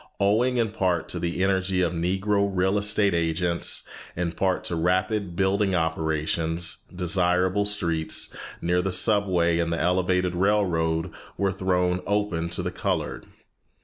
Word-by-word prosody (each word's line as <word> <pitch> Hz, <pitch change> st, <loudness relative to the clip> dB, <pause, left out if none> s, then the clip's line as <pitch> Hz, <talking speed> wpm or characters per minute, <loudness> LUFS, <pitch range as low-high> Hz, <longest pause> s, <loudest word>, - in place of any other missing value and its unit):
Owing 115 Hz, +6 st, +2 dB
in 115 Hz, -3 st, +1 dB
part 90 Hz, -4 st, 0 dB
to -, -, -3 dB
the 85 Hz, +2 st, -1 dB
energy 95 Hz, -1 st, +1 dB
of 90 Hz, -1 st, +1 dB
Negro 95 Hz, +4 st, 0 dB
real 95 Hz, +2 st, +1 dB
estate 105 Hz, -1 st, +2 dB
agents, 85 Hz, +1 st, 0 dB, 0.3 s
in 85 Hz, -1 st, -1 dB
part 95 Hz, +1 st, 0 dB
to 85 Hz, -, -2 dB
rapid 90 Hz, +2 st, 0 dB
building 95 Hz, +1 st, +1 dB
operations, 80 Hz, +1 st, -1 dB
desirable 90 Hz, +2 st, +1 dB
streets, 85 Hz, -6 st, 0 dB, 0.3 s
near 90 Hz, +1 st, +2 dB
the 95 Hz, +1 st, -1 dB
subway 90 Hz, -4 st, +2 dB
and 85 Hz, 0 st, 0 dB
the 85 Hz, -, -1 dB
elevated 90 Hz, +1 st, +1 dB
railroad, 90 Hz, -4 st, +1 dB, 0.3 s
were 100 Hz, -1 st, +1 dB
thrown 90 Hz, -1 st, 0 dB
open 100 Hz, -5 st, -1 dB
to -, -, -2 dB
the -, -, -2 dB
colored. -, -, -3 dB
90 Hz, 140 wpm, -25 LUFS, 85-100 Hz, 0.3 s, Owing